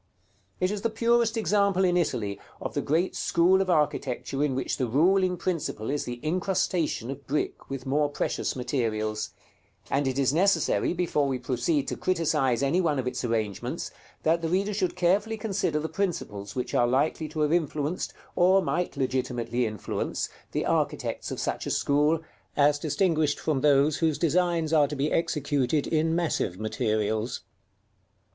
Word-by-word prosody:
It 185 +1 +1
is 210 -1 -3
the 230 - +1
purest 230 0 +2
example 200 -3 +2
in 180 -1 +2
Italy 115 - -1 0.2
of - - -5
the - - 0
great 165 +6 0
school 180 +3 +3
of 190 - -1
architecture 145 -4 0
in 140 -3 0
which 130 - -2
the 130 - 0
ruling 180 +8 +3
principle 155 -11 -2
is 145 - -1
the 120 0 -5
incrustation 170 - 0
of 140 +1 -9
brick 150 +3 -2
with 135 -2 -5
more 145 +2 +1
precious 145 - -2
materials; 110 -4 -1 0.6
and 140 0 +1
it 130 0 -1
is 135 -1 +2
necessary 195 +5 +2
before 170 -5 0
we 135 -1 -1
proceed 130 +4 0
to - - -2
criticise 150 -8 +1
any 145 +7 +2
one 155 -5 +1
of 130 - -1
its 125 - -3
arrangements, 110 -4 -2 0.3
that 165 +2 +2
the 165 - -1
reader 195 +4 +1
should 190 -3 -1
carefully 200 +5 +1
consider 200 -8 -1
the 155 - -2
principles 155 - -3
which 125 - -3
are 120 - +3
likely 150 +5 0
to 155 0 -3
have 150 +1 +2
influenced, 155 0 -1 0.2
or 185 +2 +5
might 180 -4 -1
legitimately 125 -2 -1
influence, 110 -3 -3 0.2
the - - -1
architects - - -1
of - - -4
such - - -2
a - - -1
school, 150 +3 +2 0.4
as 145 0 +4
distinguished 155 -1 +1
from 150 -4 0
those 145 +1 +4
whose 160 -3 +1
designs 170 -1 +1
are 150 -2 +5
to 150 - -5
be 140 +2 0
executed 145 -3 0
in 160 0 +1
massive 155 - -1
materials. 110 +1 -1
150 Hz, 165 wpm, -27 LUFS, 130-175 Hz, 0.6 s, or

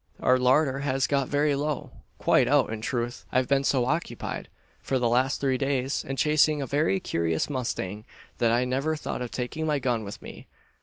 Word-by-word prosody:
Our 130 0 +3
larder 130 +2 +3
has 135 -1 0
got 140 -2 0
very 145 0 +2
low 145 0 -2 0.3
quite 125 - +3
out, 140 -4 +3
in 110 - -5
truth. 120 +1 -3
I've 130 0 +2
been 140 0 +2
so 130 -3 +2
occupied, 140 -4 -3 0.3
for 135 - -1
the 125 -2 +1
last 130 +4 +2
three 130 -2 0
days, 135 -1 0
in 135 - -4
chasing 150 +1 +3
a 140 - -2
very 150 +8 +1
curious 85 - -1
mustang, 105 -5 -3 0.3
that 115 -1 +3
I 120 +2 +2
never 135 +5 0
thought 150 - -5
of 125 - -3
taking 130 +7 -3
my 150 -1 +2
gun 120 -4 -1
with 100 0 -7
me. - - -11
130 Hz, 195 wpm, -26 LUFS, 125-145 Hz, 0.3 s, Our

